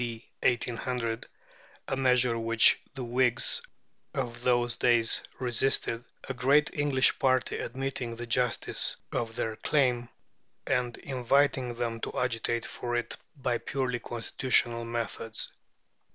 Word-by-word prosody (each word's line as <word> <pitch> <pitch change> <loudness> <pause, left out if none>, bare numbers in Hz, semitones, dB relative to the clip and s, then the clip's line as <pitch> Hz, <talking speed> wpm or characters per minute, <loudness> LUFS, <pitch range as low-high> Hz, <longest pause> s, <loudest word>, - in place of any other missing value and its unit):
D. 115 -1 -6
1800 120 -1 -1 0.6
(a - - 0
measure 125 -2 +3
which 115 0 +4
the 130 - -4
Whigs 120 0 +3 0.5
of 120 -1 -3
those 120 -1 +2
days 120 -2 +3 0.2
resisted), 120 -1 +1 0.2
a 135 - -2
great 140 +5 +3
English 145 -3 +2
party 130 -1 +1
admitting 130 -2 -4
the 120 +1 -6
justice 120 0 0
of 115 -1 -2
their 110 -2 -2
claim, 125 -5 +1 0.6
and 125 -2 0
inviting 130 -1 +1
them 115 -1 -2
to - - -3
agitate 120 -1 0
for 120 0 -4
it 120 - -2 0.2
by 125 -4 -1
purely 130 -3 -2
constitutional 120 0 0
methods. 115 -1 -3
120 Hz, 120 wpm, -29 LUFS, 115-130 Hz, 0.6 s, which